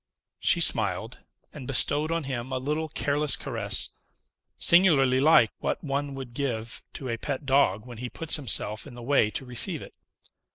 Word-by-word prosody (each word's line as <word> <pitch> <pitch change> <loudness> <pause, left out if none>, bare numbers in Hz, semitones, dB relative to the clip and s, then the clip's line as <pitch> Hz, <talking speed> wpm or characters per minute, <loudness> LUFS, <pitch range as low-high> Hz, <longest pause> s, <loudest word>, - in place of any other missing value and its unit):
She - - +2
smiled, - - -1 0.3
and 135 -4 -9
bestowed 145 +3 +2
on 165 -1 -1
him 130 -2 -5
a 130 - -1
little 150 +4 -3
careless 145 0 +1
caress, 115 -7 +1 0.7
singularly 145 -8 +4
like 135 -6 +5
what - - -3
one 140 -1 -3
would 130 -3 -8
give 120 -4 -4
to 135 - -7
a 115 -2 -3
pet 140 +3 -4
dog 130 -7 +2
when 120 -3 -10
he 125 0 -5
puts 165 +4 +2
himself 110 -4 -3
in 130 - -12
the 120 - -10
way 130 -4 +2
to 130 - -6
receive 125 -1 +2
it. - - -14
135 Hz, 170 wpm, -26 LUFS, 120-145 Hz, 0.7 s, like